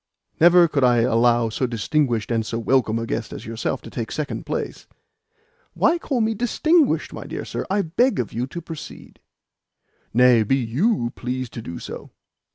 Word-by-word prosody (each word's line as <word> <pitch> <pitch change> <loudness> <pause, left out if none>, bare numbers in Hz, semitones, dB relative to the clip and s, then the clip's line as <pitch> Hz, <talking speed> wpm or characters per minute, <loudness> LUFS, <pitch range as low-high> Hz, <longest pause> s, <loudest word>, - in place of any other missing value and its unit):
Never 175 +1 +7
could 145 -3 0
I 120 -2 +4
allow 120 0 +3
so 125 +4 -1
distinguished 120 0 0
and 115 -1 +1
so 115 +1 -4
welcome 115 -1 +1
a 115 - -2
guest 115 0 -3
as - - -8
yourself 115 0 -3
to - - -10
take 115 -3 -5
second 150 -2 -4
place." - - -4 0.9
"Why 345 - +3
call 265 -7 -1
me 220 0 +1
'distinguished,' 285 - +2
my - - -7
dear - - -6
sir? - - -5
I 200 +1 +1
beg 205 +8 +1
of 120 - -3
you 120 +3 -2
to 170 +5 -7
proceed." 160 -2 -10 0.9
"Nay; 125 0 +5
be 110 +5 +2
YOU 125 - 0
pleased 125 0 -4
to 115 - -6
do 85 -6 -7
so." - - -8
125 Hz, 175 wpm, -22 LUFS, 115-170 Hz, 0.9 s, Never